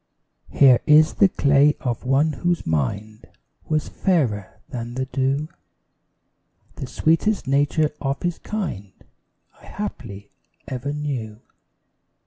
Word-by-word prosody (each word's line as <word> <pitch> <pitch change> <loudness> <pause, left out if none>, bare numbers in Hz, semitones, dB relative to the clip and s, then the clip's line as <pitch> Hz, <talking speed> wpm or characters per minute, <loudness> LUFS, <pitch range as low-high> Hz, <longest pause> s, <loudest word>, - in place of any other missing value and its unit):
Here 130 -4 +5
is 155 +1 +6
the 200 - +4
clay 145 -1 +3
of 120 -2 -3
one 140 +4 +2
whose 175 +5 -1
mind 100 - -3 0.4
Was 155 -1 0
fairer 125 - -1
than 120 0 -6
the 130 0 -2
dew, 135 +3 -1 1.3
The 135 - -5
sweetest 165 +6 +1
nature 145 +3 +2
of 135 0 -2
his 175 -1 -2
kind 125 - -5 0.7
I - - -16
haply 100 - -7 0.4
ever 135 +1 -4
knew. 130 -8 -4
140 Hz, 115 wpm, -22 LUFS, 115-155 Hz, 1.3 s, is